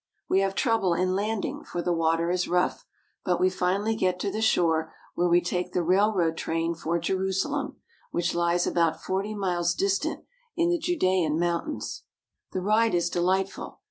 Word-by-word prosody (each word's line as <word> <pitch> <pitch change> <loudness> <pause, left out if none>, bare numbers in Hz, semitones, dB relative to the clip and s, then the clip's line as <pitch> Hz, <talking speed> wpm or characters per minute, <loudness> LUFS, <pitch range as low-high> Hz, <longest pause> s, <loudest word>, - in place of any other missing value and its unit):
We 190 - +3
have 195 0 0
trouble 210 -7 +2
in 185 +2 +1
landing, 210 +2 -2
for 175 - -4
the 175 - +1
water 165 +1 +1
is 180 0 0
rough; 180 +1 0 0.4
but 180 -2 0
we 185 +1 +3
finally 190 +4 0
get 185 -4 0
to 200 - -1
the 215 +2 -3
shore, 160 -6 +2 0.2
where 175 - +1
we 175 +1 +5
take 180 0 -3
the 180 - +1
railroad 180 -2 +2
train 165 +1 -1
for 165 +1 -2
Jerusalem, 190 - -1 0.3
which 175 +1 -1
lies 170 0 +1
about 165 -2 +1
forty 195 +3 -2
miles 175 -3 0
distant 200 - -1 0.3
in 340 0 +2
the 345 - +1
Judean 185 - +1
Mountains. 175 - -2 0.5
The 185 - -2
ride 220 +1 +3
is 175 0 0
delightful. 190 +2 -1
180 Hz, 170 wpm, -26 LUFS, 170-200 Hz, 0.5 s, we